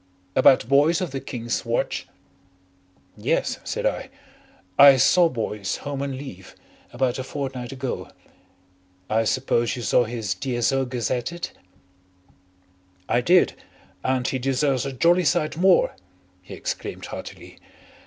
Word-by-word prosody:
"About 130 -4 +5
Boyce 145 +5 +4
of 180 -5 -3
the 135 - -3
King's 120 -3 -4
Watch?" - - -2 1.1
"Yes," - - -1
said - - -3
I. - - -1 0.7
"I 140 +2 +9
saw 170 +6 +5
Boyce, 105 -6 -3
home 140 -1 -3
on 140 -2 -3
leave, 115 -10 -10 0.4
about 125 +1 -1
a - - -2
fortnight 130 -2 -5
ago. 135 -1 -5 1.0
I 110 +1 +2
suppose 120 -1 +1
you 120 - -6
saw 120 - +3
his 110 -3 -3
D.S.O. 135 +1 0
gazetted?" 125 +7 -3 1.6
"I 120 - +2
did. 175 +7 +4 0.5
And 130 -1 0
he 130 - -1
deserves 135 +1 0
a - - -3
jolly 170 +7 +3
sight 155 0 +1
more," 190 - +3 0.5
he - - -10
exclaimed - - -5
heartily. - - -9
130 Hz, 125 wpm, -24 LUFS, 120-145 Hz, 1.6 s, I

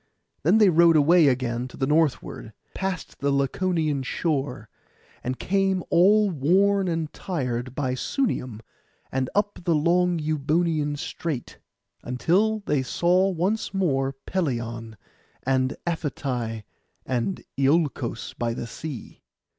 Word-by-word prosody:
Then 175 +9 +4
they 210 -3 +6
rode 170 0 +6
away 160 +2 +6
again 125 -2 0
to 125 - -13
the 135 - 0
northward, 150 -6 0 0.2
past 190 -4 -4
the 140 - 0
Laconian 150 +2 0
shore, 135 -5 -2 0.6
and 130 +1 -2
came 195 -1 +1
all 200 +4 +5
worn 190 +6 +3
and 165 -3 -2
tired 125 -8 -3
by 130 -3 -1
Sunium, 130 - -2 0.5
and 130 -1 -1
up 205 0 0
the 170 -2 +2
long 175 +3 +2
Euboean 155 0 0
Strait, 145 -2 -5 0.4
until 190 - +1
they 150 -8 0
saw 180 +8 +2
once 195 +4 -1
more 135 -8 +1
Pelion, 115 - -3 0.5
and 130 0 +1
Aphetai, 130 -9 -3 0.4
and 130 +9 -2
Iolcos 135 -4 0
by 115 -1 -1
the - - -4
sea. 130 +2 -8
150 Hz, 120 wpm, -25 LUFS, 130-180 Hz, 0.6 s, they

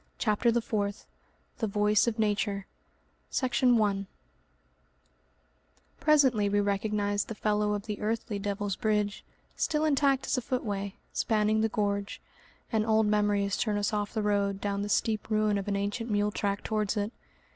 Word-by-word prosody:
CHAPTER 225 +1 +2
THE 235 0 0
FOURTH 205 -4 -2 0.5
The 225 - 0
Voice 210 +2 +2
of 230 - 0
Nature 205 -2 0 0.6
Section 250 -1 +2
1 200 -2 +1 1.9
Presently 265 -9 +4
we 205 +1 +2
recognise 205 0 0
the 225 - -6
fellow 210 0 +1
of 205 -1 -3
the 210 -2 -5
earthly 220 -1 -2
Devil's 200 -1 -2
Bridge, 210 -2 0 0.3
still 305 0 0
intact 275 -2 +2
as 265 - +1
a - - -6
footway, 205 -6 -3 0.2
spanning 215 0 +2
the 220 - +2
gorge, 200 -1 -2 0.5
and 220 -2 +2
old 220 0 +3
memories 205 -1 +1
turn 210 -2 0
us 205 +1 -1
off 210 +2 -2
the 215 - 0
road 200 -1 +1
down 200 0 -2
the 205 - -3
steep 215 +1 0
ruin 215 -1 +2
of 195 - -6
an 200 - 0
ancient 205 +4 -2
mule 205 0 +1
track 200 -1 -2
towards 215 -1 -1
it. 205 +1 -1
210 Hz, 155 wpm, -29 LUFS, 205-220 Hz, 1.9 s, Presently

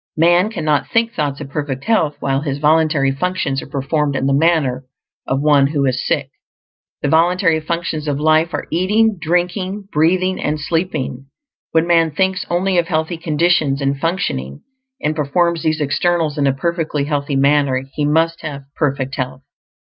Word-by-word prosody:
Man 175 +5 +4
cannot 155 -9 -1
think 230 0 +1
thoughts 145 -1 -2
of 135 -2 -8
perfect 145 -3 -3
health 165 -10 +1
while 135 0 0
his 140 -2 -3
voluntary 150 -2 +2
functions 140 -2 -2
are - - -10
performed 140 +1 -1
in 135 - -1
the 135 - +2
manner 140 -4 +2 0.4
of 135 +1 0
one 145 -2 +4
who 145 -1 0
is 130 -2 -1
sick. - - -1 0.7
The - - +1
voluntary 165 +1 +3
functions 160 -1 -3
of 145 -1 -1
life 155 +2 +3
are - - -4
eating, 205 +4 +2
drinking, 185 +4 -1
breathing, 185 +4 +1
and 150 +1 -1
sleeping. 145 -5 -2 0.4
When 160 0 +2
man 165 -1 +3
thinks 190 +5 -1
only 180 +1 +1
of 170 - -1
healthy 160 0 -1
conditions 155 -3 +1
and 140 0 0
functioning, 135 - -3 0.4
and 150 +1 -1
performs 165 +3 +1
these 155 0 0
externals 155 +2 0
in 145 -2 +1
a 135 - +2
perfectly 160 -1 -1
healthy 145 -1 -2
manner, 140 -1 +2
he 150 - -2
must 160 +3 +1
have 145 -3 -6
perfect 135 -3 -1
health. 130 0 -4
155 Hz, 165 wpm, -18 LUFS, 140-170 Hz, 0.7 s, Man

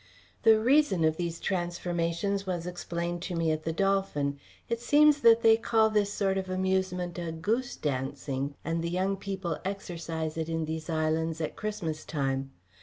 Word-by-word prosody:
The 220 -1 +6
reason 240 - +3
of 160 0 +2
these 170 -1 -3
transformations 175 +2 -1
was 175 -2 -2
explained 175 -1 -3
to 180 0 -4
me 165 -1 +1
at 155 0 -3
the 165 - 0
"Dolphin." 165 -7 0 0.3
It 235 0 -2
seems 290 +3 +5
that 230 -2 +6
they 225 0 +7
call 220 -1 +3
this 205 -1 +2
sort 195 -1 0
of 190 -1 -5
amusement 185 -1 -1
"a 170 -1 -3
goose 225 +10 -1
dancing," 140 0 -3
and 165 +1 -1
the 170 - -1
young 190 +3 0
people 195 -3 -4
exercise 165 -5 -4
it 160 0 -2
in 165 -1 -1
these 160 +1 -5
islands 160 0 0
at 155 - -3
Christmas 170 -8 -4
time. 135 -2 -2
175 Hz, 170 wpm, -29 LUFS, 160-195 Hz, 0.3 s, they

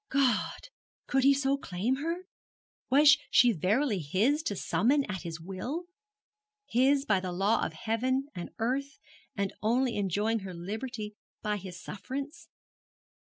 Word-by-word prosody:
God! 265 -4 +1 0.4
could 270 -1 +1
he 275 +1 +6
so 275 0 +1
claim 215 +5 -1
her? 335 +5 -3 0.6
Was 290 +3 +7
she 245 -1 +6
verily 210 - +1
his, 205 - +1
to 210 -10 -2
summon 240 - +2
at 190 -3 -4
his 170 -2 -6
will? 195 - -5 0.8
his 270 +4 +3
by 200 -9 +3
the 185 -1 -4
law 195 +5 +2
of - - -2
heaven 255 +4 -1
and 175 -2 -6
earth, 275 +5 -1 0.4
and 200 -1 -1
only 240 +2 +1
enjoying 205 +3 +1
her 190 -3 -7
liberty 210 +4 -5 0.3
by 210 -1 0
his 180 -2 -8
sufferance? 270 +11 -6
225 Hz, 140 wpm, -30 LUFS, 195-275 Hz, 0.8 s, Was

